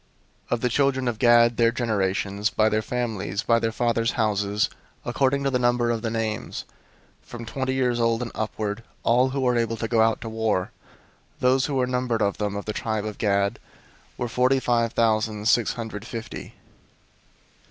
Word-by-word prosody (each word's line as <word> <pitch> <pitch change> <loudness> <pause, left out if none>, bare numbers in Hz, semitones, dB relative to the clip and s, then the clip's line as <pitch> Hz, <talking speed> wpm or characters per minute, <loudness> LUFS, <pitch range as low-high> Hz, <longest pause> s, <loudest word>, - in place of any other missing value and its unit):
001:024 - - -1
Of 120 - -1
the 125 - +1
children 130 0 +1
of 115 -3 -2
Gad, 120 -1 +5
their 115 -1 +4
generations, 100 -3 0
by 110 0 +2
their 110 0 +1
families, 110 -4 -3
by 115 0 +3
their 115 -1 0
fathers' 115 0 0
houses, 105 -2 +1 0.4
according 140 +1 +1
to 135 - +1
the 125 - +1
number 120 -1 +2
of 115 -1 -2
the 115 - -2
names, 110 -1 -3 0.6
from 120 -1 -9
twenty 130 +3 -2
years 125 -2 +1
old 115 0 +1
and 115 - -6
upward, 110 0 -3 0.2
all 125 +3 +3
who 135 +1 -2
were 125 -1 +2
able 115 -1 0
to 115 - -2
go 110 0 +2
out 110 0 +3
to - - -6
war; 110 -4 -1 0.6
001:025 - - -36
those 130 +1 +3
who 145 - -2
were 130 -1 +2
numbered 125 -3 0
of 100 0 -1
them, 105 -1 -1
of 100 - -5
the 105 - -3
tribe 110 -1 -2
of 105 -1 -6
Gad, 100 -1 +1 0.6
were 120 - -2
forty 125 +3 +2
five 115 -2 +1
thousand 110 -2 +1
six 115 0 +3
hundred 110 -3 -6
fifty. 115 -2 -7
115 Hz, 190 wpm, -24 LUFS, 110-125 Hz, 0.6 s, Gad